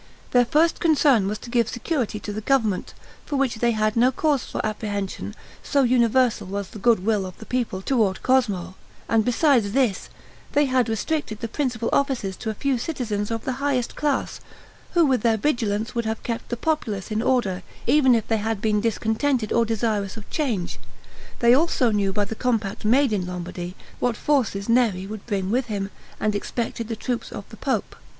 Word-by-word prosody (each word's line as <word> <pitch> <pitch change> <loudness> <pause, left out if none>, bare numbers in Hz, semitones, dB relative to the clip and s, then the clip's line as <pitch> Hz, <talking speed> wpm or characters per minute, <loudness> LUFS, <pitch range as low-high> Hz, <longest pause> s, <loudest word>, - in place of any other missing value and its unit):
Their 245 -1 +5
first 320 +7 +2
concern 285 - +4
was 210 +1 -2
to 235 - -10
give 235 -2 +2
security 240 -4 -2
to 205 - -5
the 215 - -4
government, 220 -5 0 0.3
for 290 - -4
which 270 -4 +1
they 235 +2 +2
had 215 -1 +1
no 245 +2 +4
cause 290 0 +1
for - - -5
apprehension, 205 -2 -3 0.3
so 280 -2 +2
universal 240 -3 +3
was 200 0 -4
the 215 - -10
good 220 -3 +3
will 210 -3 +2
of 185 -1 -8
the 220 - -11
people 230 -7 -2
toward 215 -8 +1
Cosmo; 205 -9 +1 0.3
and 225 -1 +3
besides 245 -4 +3
this, 245 -7 +1 0.4
they 290 0 +4
had 255 -3 +2
restricted 225 0 -2
the 230 - -3
principal 240 -2 -2
offices 255 -9 0
to 225 - -4
a 215 - -3
few 270 +2 0
citizens 225 -8 -2
of 225 -1 -3
the 265 - 0
highest 270 -4 0
class, 290 -3 -1 0.6
who 340 -2 +6
with 260 -5 +2
their 225 -1 +3
vigilance 220 -4 0
would 235 -2 -1
have 220 0 -3
kept 230 -1 -4
the 240 - -2
populace 225 -10 -2
in 215 +1 0
order, 220 -8 +1 0.2
even 260 -1 +5
if 225 - -1
they 225 - +2
had 220 0 -2
been 210 0 +1
discontented 225 +2 0
or 235 0 +3
desirous 220 -2 -1
of 215 - -9
change. 210 - -2 0.6
They 235 0 +6
also 265 -4 +3
knew 200 -2 +1
by 205 +1 0
the 205 - -5
compact 220 -4 -1
made 255 +2 +4
in 185 -3 -1
Lombardy 180 0 -5 0.2
what 240 -3 0
forces 230 -9 0
Neri 230 -6 +2
would 210 +2 -8
bring 195 -3 -1
with 250 +1 +1
him, 200 -2 -3 0.3
and 215 -1 +1
expected 230 +2 -3
the 225 - -3
troops 245 +1 -3
of - - -7
the - - -12
pope. - - -2
230 Hz, 190 wpm, -24 LUFS, 205-255 Hz, 0.6 s, who